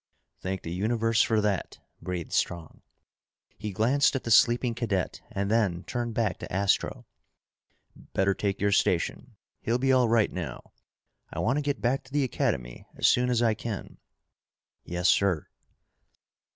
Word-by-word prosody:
"Thank 95 0 -4
the 85 - -5
universe 115 +3 +1
for 110 -2 +2
that," 105 -2 -1 0.2
breathed 90 -3 -5
Strong. 85 -3 -2 0.8
He 105 -1 -4
glanced 130 +9 +2
at 135 - -2
the 115 - -3
sleeping 120 +2 +5
cadet 110 -6 -2
and 100 +1 -2
then 100 -6 +1
turned 120 -2 -3
back 110 -6 0
to - - -8
Astro. 100 +1 0 0.9
"Better 95 +1 -1
take 100 0 -2
your 100 +1 +2
station. 90 -4 0 0.3
He'll 115 +2 +1
be 135 +1 +2
all 125 -3 +4
right 115 -2 +3
now. 90 -4 -6 0.6
I - - -9
want 130 +5 +1
to - - -1
get 145 -1 -2
back 125 +3 +1
to 130 - -18
the 145 0 +1
Academy - - -2
as - - +3
soon 125 0 +3
as 120 -1 +2
I 115 -2 +3
can." 110 -2 -6 0.8
"Yes, 90 0 -1
sir." 90 -6 +3
110 Hz, 155 wpm, -27 LUFS, 95-120 Hz, 0.9 s, sleeping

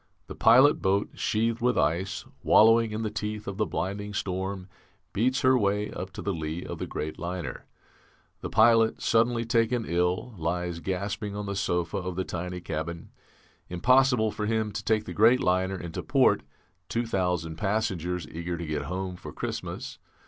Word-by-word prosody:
The - - -8
pilot 130 +6 +6
boat, 100 +2 +1
sheathed 115 +2 0
with 125 +1 +2
ice, 90 +5 0 0.2
wallowing 115 +1 +5
in 110 +1 -3
the 110 - -2
teeth 105 0 -4
of 100 -1 -4
the 105 -1 +1
blinding 100 +3 -3
storm, 95 0 -3 0.5
beats 130 +5 +1
her 130 -2 +5
way 105 -2 +1
up 90 +1 -5
to - - -7
the 100 - -1
lee 80 +1 -4
of - - -6
the - - -4
great 75 +1 -5
liner. 90 -2 -5 0.7
The - - -5
pilot, 115 0 +4
suddenly 115 0 +2
taken 115 0 +1
ill, 90 +7 0
lies 85 +1 -2
gasping 100 +3 -3
on 105 0 -4
the 100 0 -3
sofa 90 0 -1
of 90 -1 -4
the 95 +1 -2
tiny 90 +1 -5
cabin. 85 0 -5 0.6
Impossible 125 +4 +3
for 105 0 -3
him 110 -1 0
to 100 - -5
take 110 -1 +1
the - - -6
great 115 +4 +5
liner 95 0 +1
into 85 -2 -5
port; - - +3 0.5
2,000 90 -8 -1
passengers 90 -5 -1
eager 85 +2 -4
to 85 - -5
get 75 -1 -3
home 90 0 -3
for - - -9
Christmas. - - -5
100 Hz, 170 wpm, -27 LUFS, 90-110 Hz, 0.7 s, pilot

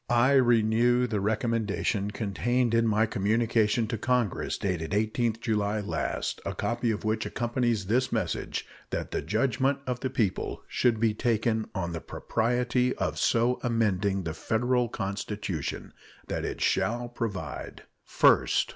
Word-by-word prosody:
I 120 +3 +4
renew 120 -1 +4
the 110 -4 -1
recommendation 105 -1 0
contained 115 +4 0
in 115 0 +3
my 110 +1 +3
communication 110 +2 +1
to 115 - -2
Congress 120 -4 0
dated 85 -5 -2
the 105 +2 +2
18th 115 0 -1
July 105 -2 0
last 100 - -3
a - - -4
copy 120 0 -1
of 105 -2 -2
which 110 0 0
accompanies 120 -3 -1
this 125 +6 +1
message - - -2 0.2
that - - -3
the - - -1
judgment 130 +5 +1
of 125 -1 -2
the 130 - -2
people 110 -7 -1
should 120 -3 +1
be 110 -1 +2
taken 110 0 0
on 85 -3 -2
the 80 -1 -5
propriety 125 +2 0
of - - -2
so 120 +1 +2
amending 100 -5 +1
the 80 -1 -3
Federal 120 +6 0
Constitution 100 -5 -4 0.3
that - - -3
it - - -4
shall 120 +2 +1
provide 100 - -5 0.2
First. - - +3
115 Hz, 145 wpm, -28 LUFS, 105-120 Hz, 0.3 s, I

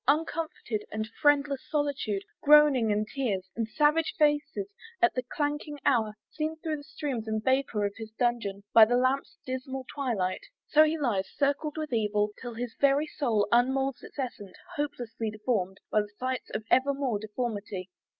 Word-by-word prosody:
uncomforted 305 -7 0
And 215 +1 -3
friendless 285 -2 +3
solitude, 280 -9 -1 0.2
groaning 290 -6 +6
and 210 +1 0
tears, 210 -9 -2
And 225 -1 -1
savage 300 +5 +2
faces, 300 +5 +2 0.3
at 355 -1 +4
the 255 - -1
clanking 295 +3 -3
hour, 220 -5 +2 0.2
Seen 310 +1 -2
through 315 -1 -3
the 290 - -10
steams 275 -7 -4
and 220 0 -1
vapour 260 -5 +1
of 200 - -2
his 220 -1 -7
dungeon, 230 -5 0
By 225 -1 +10
the 245 +2 +2
lamp's 260 +2 0
dismal 260 0 -4
twilight! 225 -10 -1 0.3
So 305 +1 +6
he 315 +1 0
lies 230 -10 0
Circled 290 +2 -1
with 305 -4 -3
evil, 210 -2 +1
till 240 -2 -6
his 235 0 -4
very 280 +2 +4
soul 235 -10 0
Unmoulds 265 +2 +2
its - - -13
essence, 220 -8 -5 0.2
hopelessly 240 -6 -3
deformed 210 -3 -1
By 215 - +4 0.2
sights 255 0 -3
of - - -4
ever 275 +2 +4
more 260 -7 -1
deformity! 205 -4 -4
255 Hz, 160 wpm, -29 LUFS, 215-290 Hz, 0.3 s, By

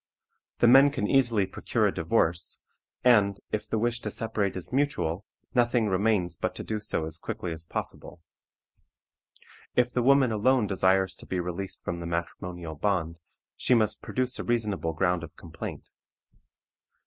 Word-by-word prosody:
The 120 - +4
men 135 +4 +8
can 135 -7 -2
easily 120 -7 +3
procure 95 - -1
a - - +2
divorce, 85 +1 0 0.4
and, 105 -5 +4
if 105 - -2
the - - 0
wish 120 +2 0
to 110 - -4
separate 105 -2 -2
is 95 - -6
mutual, 130 - 0 0.3
nothing 120 -3 +2
remains 95 -3 +1
but - - -2
to - - -5
do 110 -1 -3
so 80 -6 -2
as 80 +1 -6
quickly 110 -4 -4
as 80 0 -4
possible. - - -6 1.6
If 125 0 +2
the 125 - +1
woman 135 -1 +4
alone 115 +2 +3
desires 95 -1 +2
to - - -10
be 95 - -2
released 90 +2 -5
from 85 - -3
the 85 - -5
matrimonial 85 0 -4
bond, 85 -1 -1 0.4
she 125 - +2
must 110 -2 +2
produce 125 0 -2
a - - -2
reasonable 105 -8 -1
ground 90 +1 +1
of 85 0 -9
complaint. 85 -1 -8
105 Hz, 160 wpm, -27 LUFS, 90-120 Hz, 1.6 s, men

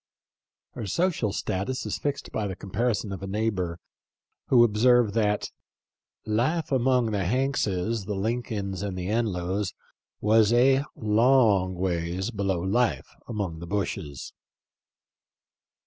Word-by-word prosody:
Her 115 -4 -6
social 160 - 0
status 100 +8 -2
is - - -3
fixed 145 -1 -3
by 105 - -2
the 95 - -4
comparison 105 +2 -2
of 95 - -6
a 95 - -5
neighbor, 95 -5 -1 0.7
who 120 -2 +6
observed 120 0 +4
that 105 -2 0 0.4
" - - -67 0.2
life 130 +11 0
among 125 -3 +2
the 100 -2 0
Hankses, 110 -3 0
the 105 - -2
Lin 115 +5 -1
colns, 100 -5 -4
and 100 -2 -3
the 90 +1 -3
Enlows 100 -3 -1 0.4
was 110 0 +4
a 135 +3 +4
long 110 -4 +3
ways 90 +3 -2
below 95 -5 -1
life 95 - 0 0.2
among 100 -8 -3
the 85 - -8
Bushes." 85 -8 -4
105 Hz, 130 wpm, -26 LUFS, 95-120 Hz, 0.7 s, who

